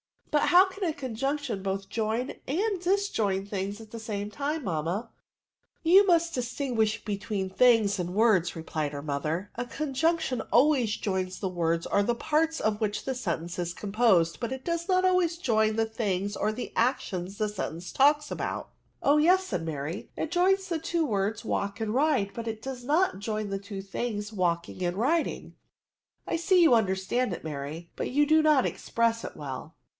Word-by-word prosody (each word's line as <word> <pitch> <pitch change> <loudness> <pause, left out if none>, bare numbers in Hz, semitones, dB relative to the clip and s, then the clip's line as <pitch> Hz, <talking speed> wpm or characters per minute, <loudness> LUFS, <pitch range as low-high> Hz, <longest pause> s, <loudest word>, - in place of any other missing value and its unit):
Sut 295 - +3
how 365 +2 +6
can 385 +1 -4
a - - -1
coi^m^ction 270 -3 -3
both 195 0 -3
join 225 +3 -1 0.2
and 390 +7 0
dis 395 +3 +1
join 195 - 0
things 200 +1 -4
at 220 -1 -13
the 230 - -6
same 210 -2 -4
.time, 290 +6 -2
manmia? 175 +4 -2 0.3
" - - -66
" - - -46
You 380 +5 +6
must 340 -1 +3
distinguish 240 -3 -1
between 200 -2 -3
things 215 -2 +4
and 180 +1 -3
words," 210 -6 +3
replied 155 -2 -3
her 140 0 -5
mother: 155 +6 -2
^^ - - 0
a - - -11
conjunc 310 +5 0
tion 255 -6 -2
always 250 -4 +4
joins 185 -2 -2
the 190 - -2
words 170 -2 0
or 200 - +2
the 235 +4 +1
parts 315 +5 +1
of 215 -1 0
which 210 -1 -1
the 265 - -2
sentence 175 -7 -3
is 175 -1 -2
composed, 200 -5 +2
but 235 +2 -2
it 265 0 -7
does 335 0 -2
not 370 -1 +3
always 365 -2 +2
join 220 -8 +2
the 225 0 +2
things 205 -3 -2
or 210 - +1
the 245 +3 -6
actions 210 -7 -1
the 215 -1 0
sentence 180 -4 -5
talks 295 +2 +3
about." - - -3 0.2
" - - -26
Oh 285 +2 +5
yes," 360 +5 +5
said 175 - -3
Mary, 155 +4 -4
" - - -42
it 320 - -3
joins 380 +2 +2
the 335 -2 -1
two 330 +1 0
words 210 -2 -1
walk 200 0 -2
and 220 -1 -1
ride, 265 -7 +2
but 230 +1 -6
it 220 -1 -4
does 260 -2 -6
not 310 - +2
join 215 0 -3
the 195 0 -2
two 200 -1 -7
things 210 +1 -4
walking 175 -2 -1
and 175 0 -1
riding." 310 +9 0 0.7
^' - - -1
Jjiee 335 +4 -3
that 375 - +6
you 330 -7 +6
understand 200 +1 +1
it, - - -7
Mary, 155 +2 -6
but - - -3
you 290 +3 +3
do 315 +2 +5
not 305 -4 +4
express 230 0 0
it - - -7
well. 145 +2 -7
220 Hz, 200 wpm, -28 LUFS, 195-295 Hz, 0.7 s, how